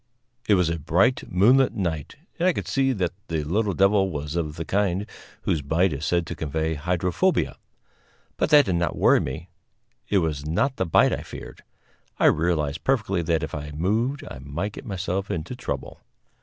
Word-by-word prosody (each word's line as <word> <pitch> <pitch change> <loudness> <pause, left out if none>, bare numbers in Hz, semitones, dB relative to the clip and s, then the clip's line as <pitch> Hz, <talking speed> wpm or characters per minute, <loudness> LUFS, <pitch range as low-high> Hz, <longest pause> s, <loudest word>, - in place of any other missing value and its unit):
It 105 - +5
was 90 -3 +2
a 85 - -3
bright 90 - +1
moonlight 120 +9 +4
night, 85 - -3 0.2
and 175 - +3
I 185 - +4
could - - -4
see 135 -1 +2
that 95 -8 -1 0.2
the 80 -2 -2
little 100 +5 0
devil 100 0 +3
was 75 -1 -4
of 80 -3 -2
the 80 - -5
kind 100 +1 0 0.4
whose 80 - 0
bite 80 +5 +1
is 70 +3 -3
said 85 -1 +1
to - - -6
convey 80 +1 -2
hydrophobia. 90 - 0 0.8
But - - 0
that 145 -2 +7
did 90 -5 0
not 85 - -1
worry - - +4
me; 80 +8 -5 0.6
it 100 - +3
was 80 -5 0
not 90 - 0
the 95 - 0
bite 80 - +4
I - - -2
feared. - - -10 0.6
I - - +2
realized 80 -2 +2
perfectly 105 -9 +1
that 80 -1 0
if 80 - -5
I 75 0 -5
moved 115 - 0
I 65 - -8
might 80 +9 -4
get - - -9
myself 95 0 -3
into 80 +9 -4
trouble. 125 - -5
90 Hz, 185 wpm, -24 LUFS, 80-100 Hz, 0.8 s, that